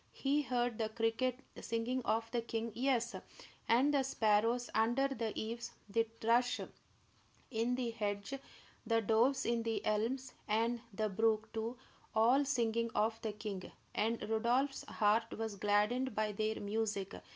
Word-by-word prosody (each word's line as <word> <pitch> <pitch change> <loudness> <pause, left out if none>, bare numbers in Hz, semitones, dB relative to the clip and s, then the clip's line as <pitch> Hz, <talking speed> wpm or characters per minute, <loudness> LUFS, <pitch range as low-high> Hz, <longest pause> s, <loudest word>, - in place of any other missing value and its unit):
He 285 +2 +1
heard 245 -4 -1
the 220 -1 0
cricket 235 +3 0 0.2
singing 230 +3 -1
of 225 +1 0
the 240 - 0
king; 230 0 -3
yes, 240 0 +1 0.6
and 260 +6 +4
the 280 - +4
sparrows 230 -1 +2
under 235 +5 +3
the 230 -5 -2
eaves, 230 +2 -4
the 225 +3 +1
thrush 240 +2 +3 0.9
in 235 +1 +1
the 245 -2 -1
hedge, 205 0 -3 0.5
the 230 -1 +2
doves 235 +5 +3
in 235 0 +1
the 225 -1 -2
elms, 245 +5 0
and 230 +2 +1
the 215 +1 -1
brook, 220 +2 +1
too, 225 +2 -3 0.4
all 240 +6 +5
singing 230 -4 +1
of 220 +2 +1
the 220 - -2
king; 205 -3 -6 0.2
and 225 +1 0
Rodolph's 245 +5 +1
heart 220 +1 +1
was 220 -2 -3
gladdened 210 +5 +2
by 215 0 +1
their 215 +1 -1
music. 205 -2 -2
230 Hz, 145 wpm, -35 LUFS, 220-245 Hz, 0.9 s, all